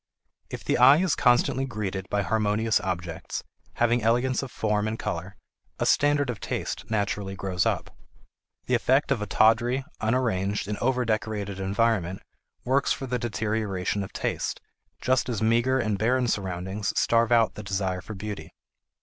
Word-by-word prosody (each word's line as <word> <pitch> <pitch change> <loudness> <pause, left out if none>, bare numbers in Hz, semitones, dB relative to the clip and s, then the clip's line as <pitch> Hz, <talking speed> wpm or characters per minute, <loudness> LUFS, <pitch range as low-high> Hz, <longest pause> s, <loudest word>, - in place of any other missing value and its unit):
If - - -7
the - - 0
eye 135 +4 +8
is 185 +1 +2
constantly 125 +1 +3
greeted 100 -6 -4
by 100 0 0
harmonious 110 +3 +1
objects, 85 -3 -4 0.3
having 120 0 +2
elegance 120 +4 +2
of 135 - -6
form 105 -1 0
and 110 +1 -2
color, 90 0 -4 0.4
a - - -1
standard 145 -2 +3
of 110 - -8
taste - - -4
naturally 100 -2 -1
grows 95 -2 -1
up. - - -2 0.7
The 125 - -1
effect 130 +4 +2
of 125 -6 +1
a 105 - -3
tawdry, 120 +6 +3
unarranged, 105 -4 0
and 105 0 -3
over 125 0 +1
decorated 105 -3 -2
environment 95 -2 0 0.4
works 135 +2 +2
for 135 - -1
the 125 -1 -2
deterioration 105 -4 -1
of 95 - -6
taste, - - -2 0.4
just 130 0 +2
as 115 -4 -1
meager 120 +4 +3
and 110 -6 0
barren 125 +3 +2
surroundings 95 0 -2
starve 115 0 +3
out 115 -2 +4
the - - -7
desire 95 -2 -2
for 110 +3 -8
beauty. 105 +1 -6
110 Hz, 160 wpm, -26 LUFS, 100-120 Hz, 0.7 s, eye